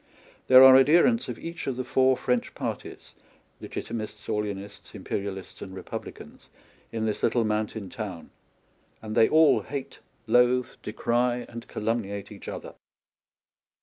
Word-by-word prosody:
There 130 0 +9
are 130 0 +10
adherents 170 - +4
of - - -5
each 170 0 -7
of 135 - -1
the 130 - -3
four 130 0 +3
French 125 -1 -1
parties - - -6 0.2
— - - -37
Legitimists, 110 -2 -6
Orleanists, 105 -1 -5
Imperialists, 95 -1 -5
and 95 -1 -8
Republicans - - -9 0.2
— - - -32
in 110 -1 -2
this 105 -1 -2
little 120 - +2
mountain 105 -1 -2
town; 95 -6 -7 0.7
and 110 -1 -7
they 110 - +5
all 160 0 +5
hate, 140 -2 -7 0.3
loathe, 125 +2 +3
decry, 120 +2 -1
and 115 -1 -9
calumniate 105 -2 -3
each 100 - -11
other. - - -7
115 Hz, 140 wpm, -26 LUFS, 105-130 Hz, 0.7 s, are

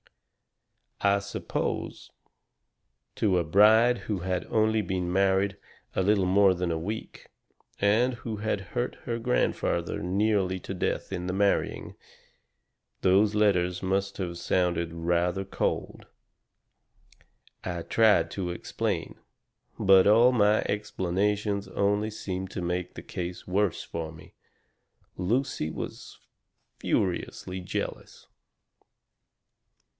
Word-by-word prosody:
"I 100 0 +4
suppose 100 0 -4 1.0
to 95 -4 +2
a 85 - +2
bride 110 +8 +5
who 105 -3 0
had 90 0 -2
only 110 0 +2
been 90 -2 -2
married 95 +1 +2 0.4
a - - +2
little 100 -1 +3
more 95 0 +5
than 90 -1 -2
a 80 - -1
week 105 +7 -6 0.5
and 115 +5 +3
who 115 -2 -6
had 105 -1 -1
hurt 120 0 -1
her 115 -1 -2
grandfather 115 -7 0
nearly 95 0 +1
to - - -6
death 90 - -2
in 90 -2 -3
the 90 - -2
marrying, 100 +1 0 1.1
those 100 +3 +4
letters 90 -4 +2
must 95 +1 -1
have 85 -3 -4
sounded 85 -1 0
rather 85 +3 0
odd. - - -2 1.6
I 85 -2 -4
tried 105 -7 +3
to 95 -3 -3
explain. 85 - -3 0.6
But 95 -1 +6
all 115 +4 +6
my 105 -3 +3
explanations 100 0 -1
only 105 +2 +1
seemed 95 -3 -5
to 95 - -4
make 90 +1 -2
the - - -9
case 90 0 -6
worse 100 0 0
for 80 -1 -5
me. 80 -1 -15 0.8
Lucy 115 - -1
was - - -7 0.6
furiously 95 0 -2
jealous. 90 - -5
95 Hz, 110 wpm, -27 LUFS, 90-105 Hz, 1.6 s, But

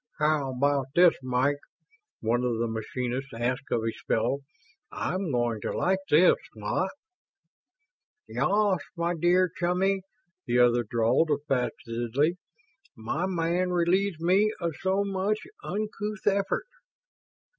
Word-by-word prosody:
"How 150 -3 +1
about 140 0 +1
this, 175 -1 +7
Mike?" 130 +3 +1 0.6
one 120 +2 +1
of 120 -2 0
the 115 +1 0
machinists 125 +4 -4
asked 125 +4 -2
of 115 - +1
his 115 0 -3
fellow. 120 +5 +1 0.5
"I'm 185 -1 -2
going 120 -3 0
to - - -3
like 190 +1 +2
this, 165 +5 +6 0.2
what?" 110 - -1 1.4
"Ya 195 - +2
as, 185 - -1 0.2
my 170 +1 0
deah 175 +2 +3
Chumley," 185 +2 +1 0.5
the 120 0 +2
other 120 0 +5
drawled, 115 +8 +2
affectedly. 135 +1 -1 0.6
"My 130 +11 -2
man 175 0 0
relieves 180 +1 +1
me 190 +6 +3
of 170 -4 -2
so 190 +1 +1
much 200 +1 0 0.3
uncouth 210 0 -4
effort." 200 - +1
155 Hz, 125 wpm, -27 LUFS, 120-185 Hz, 1.4 s, this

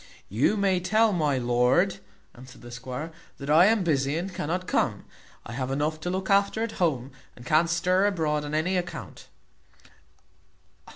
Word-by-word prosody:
"You 125 - +1
may 195 -2 +2
tell 215 +4 +2
my 150 -6 +1
lord," 125 +10 +2 0.3
answered 125 +1 -14
the 120 - -10
squire, 125 +6 -6 0.3
"that 140 +1 -4
I 165 +5 +7
am 220 -2 +2
busy 140 -3 0
and 180 +2 -4
cannot 180 +4 -3
come. - - -1 0.4
I - - -8
have 130 +1 -3
enough 150 +3 -1
to 175 - -4
look 190 +1 -3
after 200 +2 +2
at 230 - -3
home, 135 -6 0 0.2
and 120 - -14
can't 155 +5 +3
stir 185 +3 +2
abroad 155 -6 0
on 150 +1 -4
any 180 +4 +1
account." 175 -1 -6
160 Hz, 165 wpm, -26 LUFS, 135-185 Hz, 0.4 s, I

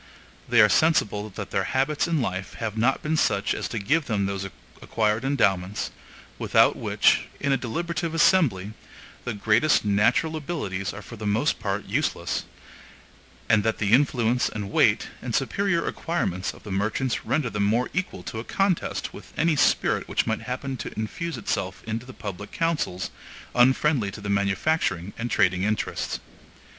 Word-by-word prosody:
They 120 -1 +6
are 105 - +8
sensible 105 - +2
that 105 - -6
their 95 -1 0
habits 140 +4 +1
in 160 -6 +1
life 95 -2 -4
have 110 -2 -4
not 120 +4 +1
been 155 +1 0
such 100 -7 +2
as - - -3
to 115 - -5
give 145 +10 +1
them 105 -4 0
those 100 0 -3 0.3
acquired 110 +1 0
endowments, 100 -8 +1 0.5
without - - +4
which, - - +2
in 140 - 0
a - - +4
deliberative 165 +7 -3
assembly, 120 - +3 0.5
the 120 -3 -3
greatest 110 +7 +3
natural 105 +10 +2
abilities 135 - -3
are 100 - -9
for 115 - -10
the 105 0 -4
most 105 +2 +1
part - - -2
useless; - - -1 1.0
and 105 -2 +4
that 110 0 0
the 105 -1 0
influence 125 -2 +3
and 105 -2 -5
weight, - - +3
and - - -3
superior 195 -4 +1
acquirements 95 - -2
of - - -16
the 105 - -7
merchants 110 +6 -1
render 135 -7 0
them 105 -1 0
more 115 +5 +1
equal 180 - -3
to 110 - -5
a - - -5
contest 195 +5 -1
with - - -12
any 165 0 +3
spirit - - +2
which - - 0
might - - -1
happen 130 +1 -4
to - - -6
infuse 160 +10 -3
itself 95 0 -3
into 115 +2 -4
the - - -8
public 105 -4 -7
councils, 155 - -1 0.4
unfriendly 130 -2 +3
to 100 - -9
the 105 0 -6
manufacturing 100 - 0
and 120 +1 -2
trading 90 -5 +2
interests. 105 +2 -1
115 Hz, 165 wpm, -25 LUFS, 100-145 Hz, 1.0 s, are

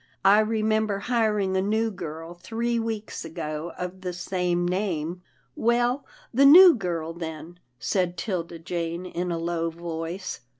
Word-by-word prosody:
" - - -24
I - - +5
re 215 0 +1
member 215 -2 +1
hiring 210 -4 +1
a 190 - +2
new 220 +3 +1
girl 165 -2 -7
three 230 +6 -2
weeks 225 -2 -4
ago 155 0 -5
of 180 +1 -5
the 180 -1 -4
same 180 -1 -1
name." 180 -3 -2 0.2
" 125 - -40
Well, 240 +3 +1 0.3
the 265 +4 +4
new 345 +6 +10
girl, 170 - -3
then," 165 +1 -7 0.2
said 180 - -1
'Tilda 175 -5 -3
Jane 170 +1 -4
in 180 0 -3
a 170 - -1
low 165 0 -1
voice. 170 +2 -5
180 Hz, 160 wpm, -26 LUFS, 170-215 Hz, 0.3 s, new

